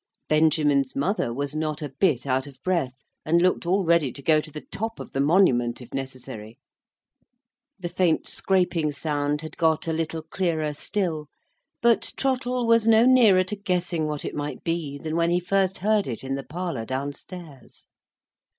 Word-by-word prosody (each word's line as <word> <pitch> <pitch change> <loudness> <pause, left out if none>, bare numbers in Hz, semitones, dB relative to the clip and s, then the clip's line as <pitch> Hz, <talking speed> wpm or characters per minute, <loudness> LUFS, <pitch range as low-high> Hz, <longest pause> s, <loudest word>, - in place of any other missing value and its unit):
Benjamin's 150 -3 +3
mother 150 - 0
was 140 +4 -3
not 155 -1 -2
a 145 - -4
bit 150 -11 +2
out 130 +1 0
of 135 -2 -13
breath, 145 -8 -1 0.2
and 170 +2 +3
looked 180 -1 +1
all 190 +2 +2
ready 165 -5 +3
to 140 - -10
go 155 0 +4
to 155 - -8
the 150 0 -9
top 225 +2 -4
of - - -8
the 135 - -3
monument 140 -7 +3
if 125 -1 -13
necessary. 125 -5 -7 1.2
The 185 -3 -5
faint 170 -2 +1
scraping 175 -5 +1
sound 145 0 -1
had 155 -1 -9
got 160 0 +1
a 165 - 0
little 160 0 -3
clearer 160 -3 -1
still; 160 -1 -2 0.6
but 235 -1 +3
Trottle 250 -2 0
was 230 -1 +4
no 225 +1 +6
nearer 230 -8 +6
to 185 +3 -4
guessing 180 -5 -1
what 150 -1 -3
it - - -4
might 145 0 -5
be, 165 -4 -2
than 155 +2 -4
when 170 0 +2
he 175 +1 +2
first 190 +1 +1
heard 215 -1 +3
it 120 -1 -5
in 135 0 -3
the 135 - -2
parlour 170 -7 -4
downstairs. 140 +3 -7
160 Hz, 175 wpm, -25 LUFS, 140-185 Hz, 1.2 s, no